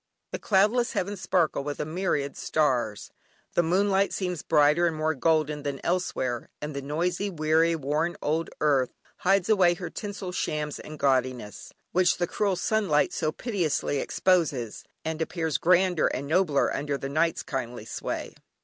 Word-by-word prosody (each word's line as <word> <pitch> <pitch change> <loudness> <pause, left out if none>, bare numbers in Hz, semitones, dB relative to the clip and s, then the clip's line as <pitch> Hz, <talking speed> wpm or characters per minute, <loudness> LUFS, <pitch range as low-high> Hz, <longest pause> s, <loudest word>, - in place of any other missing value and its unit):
The - - -4
cloudless 215 +5 +2
heavens 200 +1 -2
sparkle 175 -5 +1
with 145 0 -4
a - - -1
myriad 155 -4 -1
stars, 125 -9 0 0.4
the - - +4
moonlight 195 +3 +2
seems 180 -4 -2
brighter 150 +4 +4
and 165 - -1
more 155 +1 0
golden 155 0 +1
than 140 -2 -4
elsewhere, 130 -9 -1
and 150 -1 -5
the 140 - -3
noisy, 175 +7 -1
weary, 160 0 +2
worn 155 +3 -1
old 160 +3 -1
earth 140 -4 +3 0.3
hides 195 0 +2
away 185 -5 +4
her 175 0 -6
tinsel 200 -3 -5
shams 150 -4 -2
and 155 0 -9
gaudiness, 130 -6 -1 0.2
which 180 0 +3
the 175 - +1
cruel 200 +2 0
sunlight 185 -4 +1
so 155 -2 0
pitilessly 170 - -1
exposes, 150 - 0 0.2
and 160 0 -3
appears 160 -1 -1
grander 180 -1 +3
and 135 - -3
nobler 155 -2 +2
under 145 0 -2
night's 160 +4 0
kindly 120 -4 -4
sway. 115 - -4
160 Hz, 150 wpm, -27 LUFS, 145-180 Hz, 0.4 s, the